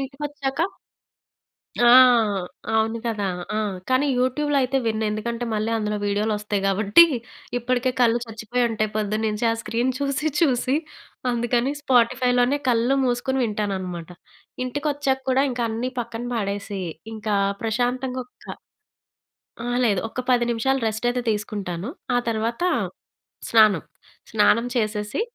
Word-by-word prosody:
ఇంటికొచ్చాక 275 Hz, +1 st, -4 dB, 1.3 s
ఆ! -, -, +8 dB, 0.9 s
అవును 225 Hz, +1 st, +1 dB
కదా! 215 Hz, -3 st, -1 dB, 0.3 s
ఆ! -, -, 0 dB, 0.3 s
కానీ 260 Hz, +3 st, +3 dB
యూట్యూబ్‌లో 280 Hz, +3 st, +1 dB
అయితే 260 Hz, +1 st, +1 dB
విన్ను. 220 Hz, 0 st, 0 dB
ఎందుకంటే 235 Hz, +3 st, -3 dB
మళ్ళీ 215 Hz, +2 st, -1 dB
అందులో 210 Hz, -1 st, -1 dB
వీడియోలొస్తయి 210 Hz, 0 st, -1 dB
గాబట్టి, 205 Hz, -, +6 dB, 0.5 s
ఇప్పడికే 250 Hz, +1 st, 0 dB
కళ్ళు 235 Hz, 0 st, +4 dB
చచ్చిపోయి 225 Hz, +2 st, -2 dB
ఉంటయి 215 Hz, -1 st, -1 dB
పొద్దున్నుంచి 215 Hz, +1 st, -1 dB
ఆ -, -, +1 dB
స్క్రీన్ 240 Hz, +3 st, 0 dB
చూసి 280 Hz, +2 st, 0 dB
చూసి. 260 Hz, -4 st, +2 dB, 0.6 s
అందుకని 240 Hz, +3 st, 0 dB
స్పాటిఫైలోనే 250 Hz, +1 st, +3 dB
కళ్ళు 240 Hz, +3 st, +2 dB
మూసుకొని 260 Hz, +1 st, 0 dB
వింటాననమాట. 190 Hz, -6 st, -3 dB, 0.6 s
ఇంటికొచ్చా‌క్కూడా 270 Hz, -1 st, 0 dB
ఇంకా 240 Hz, -1 st, -2 dB
అన్నీ 240 Hz, +3 st, -3 dB
పక్కన 235 Hz, 0 st, -5 dB
పాడేసి, 200 Hz, -2 st, -3 dB, 0.3 s
ఇంకా 215 Hz, -1 st, -2 dB, 0.3 s
ప్రశాంతంగా 250 Hz, +3 st, -1 dB
ఒక్క -, -, -23 dB, 1.2 s
ఆ! -, -, -4 dB, 0.2 s
లేదు. 205 Hz, -5 st, +2 dB
ఒక్క 255 Hz, -, -6 dB
10 240 Hz, -1 st, +3 dB
నిమిషాలు 265 Hz, +4 st, +1 dB
రెస్ట్ 220 Hz, +2 st, -3 dB
అయితే 250 Hz, -, -2 dB
తీసుకుంటాను. 205 Hz, -1 st, -4 dB, 0.3 s
ఆ -, -, +4 dB
తరువాత 230 Hz, +6 st, -2 dB, 0.9 s
స్నానం. 215 Hz, -7 st, +5 dB, 0.5 s
స్నానం 220 Hz, +2 st, +4 dB
చేసేసి, 210 Hz, -, -1 dB
235 Hz, 115 wpm, -23 LUFS, 215-255 Hz, 1.3 s, ఆ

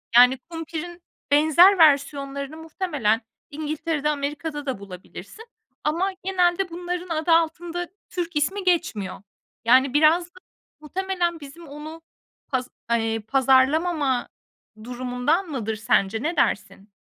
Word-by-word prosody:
Yani, 250 Hz, +2 st, +7 dB
kumpirin 330 Hz, +3 st, -7 dB, 0.3 s
benzer 315 Hz, +7 st, +6 dB
versiyonlarını 280 Hz, -2 st, +2 dB
muhtemelen 310 Hz, -, -1 dB, 0.3 s
İngiltere'de, 300 Hz, 0 st, -2 dB
Amerika'da 295 Hz, +1 st, -3 dB
da 265 Hz, -7 st, -3 dB
bulabilirsin 200 Hz, -, -11 dB, 0.4 s
ama 345 Hz, +6 st, 0 dB
genelde 365 Hz, -1 st, +1 dB
bunların 355 Hz, +1 st, -5 dB
adı 320 Hz, +1 st, 0 dB
altında 335 Hz, +1 st, +1 dB, 0.2 s
Türk 345 Hz, -2 st, -4 dB
ismi 380 Hz, +7 st, 0 dB
geçmiyor. 340 Hz, -, -1 dB, 0.4 s
Yani, 255 Hz, +3 st, +5 dB
biraz 315 Hz, +4 st, +4 dB
da 355 Hz, +1 st, -18 dB, 0.4 s
muhtemelen 350 Hz, +1 st, -2 dB
bizim 310 Hz, +3 st, -12 dB
onu 305 Hz, +3 st, -9 dB, 0.5 s
paz 255 Hz, -2 st, -2 dB, 0.2 s
eee, 225 Hz, -1 st, +1 dB
pazarlamama 270 Hz, +4 st, +2 dB, 0.6 s
durumundan 250 Hz, -, -1 dB
mıdır 225 Hz, -6 st, -3 dB
sence, 215 Hz, +1 st, +1 dB
ne 335 Hz, +3 st, -1 dB
dersin? 200 Hz, -5 st, -1 dB
305 Hz, 110 wpm, -24 LUFS, 260-345 Hz, 0.6 s, Yani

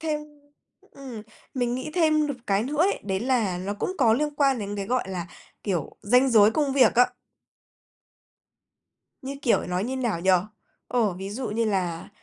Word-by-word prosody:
thêm 310 Hz, -2 st, -1 dB, 0.7 s
ừm, 255 Hz, -6 st, -9 dB, 0.3 s
mình 245 Hz, -2 st, 0 dB
nghĩ 255 Hz, +4 st, -4 dB
thêm 310 Hz, -3 st, +3 dB
được 285 Hz, -3 st, -3 dB
cái 200 Hz, 0 st, +2 dB
nữa 280 Hz, +6 st, -4 dB
ấy, 380 Hz, +5 st, +2 dB
đấy 190 Hz, -1 st, -1 dB
là 230 Hz, -8 st, 0 dB
nó 195 Hz, +3 st, -3 dB
cũng 365 Hz, -, -3 dB
có 235 Hz, -5 st, +5 dB
liên 295 Hz, +5 st, 0 dB
quan 275 Hz, -3 st, +2 dB
đến 205 Hz, -1 st, -4 dB
cái, 200 Hz, -1 st, -4 dB
gọi 255 Hz, +3 st, 0 dB
là, 180 Hz, -3 st, -4 dB, 0.4 s
kiểu, 180 Hz, -8 st, -3 dB
ranh 250 Hz, +5 st, +4 dB
giới 215 Hz, -2 st, +6 dB
công 280 Hz, +3 st, 0 dB
việc 260 Hz, -5 st, +4 dB
á. 245 Hz, +1 st, +5 dB, 2.1 s
Như 275 Hz, +1 st, -5 dB
kiểu, 240 Hz, -, +3 dB
nói 180 Hz, +3 st, -1 dB
như 260 Hz, +2 st, -3 dB
nào 235 Hz, -10 st, -1 dB
nhỉ? 190 Hz, -, +3 dB, 0.6 s
Ồ, 230 Hz, -5 st, +1 dB
ví 190 Hz, +2 st, -7 dB
dụ 235 Hz, +2 st, -4 dB
như 230 Hz, +2 st, 0 dB
là 180 Hz, -6 st, -2 dB
235 Hz, 180 wpm, -25 LUFS, 200-270 Hz, 2.1 s, giới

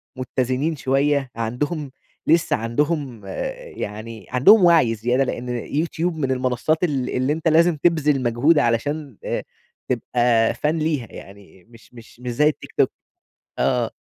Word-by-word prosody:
متّزنين 130 Hz, +4 st, -1 dB
شوية، 135 Hz, 0 st, +1 dB
عندهم 135 Hz, +6 st, -3 dB, 0.4 s
لسه 165 Hz, +1 st, +3 dB
عندهم 125 Hz, 0 st, -2 dB, 0.5 s
يعني 110 Hz, 0 st, -7 dB
عندهم 180 Hz, -, +6 dB
وعي 160 Hz, -10 st, +5 dB
زيادة، 120 Hz, +5 st, +1 dB
لأن 125 Hz, -1 st, -4 dB
يوتيوب 160 Hz, +7 st, -2 dB
من 135 Hz, -4 st, -1 dB
المنصات 130 Hz, +6 st, 0 dB
ال 135 Hz, -7 st, 0 dB
اللي 130 Hz, +3 st, 0 dB
أنت 160 Hz, +1 st, -3 dB
لازم 165 Hz, +2 st, +4 dB
تبذل 150 Hz, -4 st, +2 dB
مجهود 130 Hz, +7 st, +3 dB
علشان 140 Hz, +2 st, -1 dB
آآ، -, -, -2 dB, 0.5 s
تبقى 120 Hz, -2 st, +2 dB
فان 155 Hz, +2 st, -1 dB
ليها 150 Hz, -7 st, -1 dB
يعني، 95 Hz, -2 st, -13 dB
مش 115 Hz, +2 st, -19 dB
مش 120 Hz, 0 st, -15 dB
مش 125 Hz, -1 st, -4 dB
زي 150 Hz, +5 st, +3 dB
التيك 155 Hz, -, -3 dB
توك. -, -, +3 dB, 0.7 s
آه. -, -, +1 dB
130 Hz, 135 wpm, -22 LUFS, 120-155 Hz, 0.7 s, عندهم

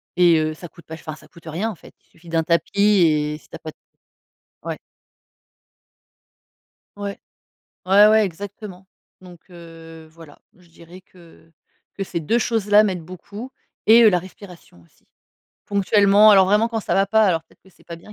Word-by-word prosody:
Et 175 Hz, -2 st, +4 dB
heu, 155 Hz, 0 st, -2 dB
ça 175 Hz, +2 st, -12 dB
coûte 170 Hz, -1 st, -19 dB
pas 160 Hz, -, -9 dB
ch -, -, -16 dB
enfin 155 Hz, -, -5 dB
ça 155 Hz, -, -19 dB
coûte 165 Hz, +2 st, -19 dB
rien 175 Hz, +8 st, -3 dB
en 215 Hz, -, -7 dB
fait. -, -, -18 dB
Il -, -, -38 dB
suffit 170 Hz, +1 st, -18 dB
d'un 165 Hz, -1 st, 0 dB
tapis 170 Hz, +4 st, -1 dB
et 155 Hz, -7 st, +2 dB
si -, -, -24 dB
tu -, -, -11 dB
as -, -, -10 dB
pas 155 Hz, -, -9 dB
de -, -, -35 dB, 0.9 s
Ouais. -, -, -5 dB, 2.2 s
Ouais. 200 Hz, -1 st, -6 dB, 0.7 s
Ouais 200 Hz, +3 st, +6 dB
ouais, 215 Hz, 0 st, +4 dB
exactement. 195 Hz, +1 st, -9 dB, 0.4 s
Donc, 180 Hz, -2 st, -15 dB
heu, 165 Hz, -2 st, -14 dB
voilà, 160 Hz, -3 st, -16 dB, 0.2 s
je 180 Hz, -1 st, -23 dB
dirais 170 Hz, +2 st, -16 dB
que 170 Hz, -3 st, -21 dB, 0.4 s
que 195 Hz, -, -4 dB
ces 180 Hz, -2 st, -5 dB
2 195 Hz, +9 st, 0 dB
choses-là 215 Hz, -3 st, +2 dB
m'aident 185 Hz, -5 st, -2 dB
beaucoup 200 Hz, +8 st, -11 dB, 0.4 s
et 230 Hz, +2 st, +7 dB
heu, 220 Hz, -, +7 dB
la 180 Hz, -, +1 dB
respiration 180 Hz, -, -15 dB
aussi. 85 Hz, -, -31 dB, 0.6 s
Ponctuellement, 200 Hz, +1 st, +4 dB
alors 190 Hz, -2 st, +5 dB
vraiment 210 Hz, +4 st, +2 dB
quand 225 Hz, -1 st, -4 dB
ça -, -, -3 dB
va 195 Hz, 0 st, +2 dB
pas, 220 Hz, +2 st, +3 dB
alors 165 Hz, -5 st, 0 dB
peut-être -, -, -29 dB
que 190 Hz, -, -22 dB
c'est -, -, -26 dB
pas 170 Hz, -, -9 dB
bien. 170 Hz, +6 st, -15 dB
180 Hz, 190 wpm, -20 LUFS, 165-205 Hz, 2.2 s, et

